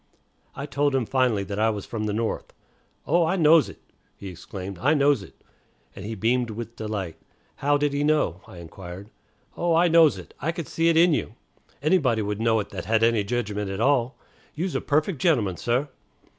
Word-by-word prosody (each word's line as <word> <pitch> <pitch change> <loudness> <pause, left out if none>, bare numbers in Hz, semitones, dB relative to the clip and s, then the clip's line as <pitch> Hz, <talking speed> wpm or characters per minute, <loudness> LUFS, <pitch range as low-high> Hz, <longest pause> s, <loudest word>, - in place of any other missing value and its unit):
I - - -5
told 140 +3 0
him 130 -3 +1
finally 125 -5 +1
that 100 +1 -5
I 110 +1 +3
was 105 -3 -4
from 110 -2 -4
the 105 - -1
North. 110 +1 -3 0.5
"Oh, 170 +3 +3
I 165 +3 +1
knows 160 -3 +5
it," - - -12 0.4
he 100 - -8
exclaimed, 90 +1 -8
"I 145 +6 +3
knows 140 -4 +3
it;" 95 - -13 0.6
and 100 - -8
he 110 +2 -5
beamed 120 +4 +1
with 115 +1 -7
delight. 105 -7 -4 0.4
How 145 +1 +2
did 145 0 0
he 145 +1 0
know, 145 - +1
I 90 - -12
inquired. 90 +4 -10 0.4
"Oh, 170 -1 +1
I 170 +2 +4
knows 165 -2 +5
it. - - -11
I 165 - -1
can 170 -2 -5
see 165 +3 +1
it 165 - +3
in 170 0 +5
you. 115 - -2 0.5
Anybody 140 - +2
would 105 +1 -3
know 115 -1 +3
it 100 - -10
that - - -6
had 110 0 +2
any 115 -2 +3
jedgment 105 -2 -2
at 95 +1 -4
all. 130 0 +1 0.4
You's 175 +4 -2
a - - -1
perfect 155 +2 0
gentleman, 110 - +2
sah." 120 +4 0
120 Hz, 200 wpm, -25 LUFS, 105-150 Hz, 0.6 s, knows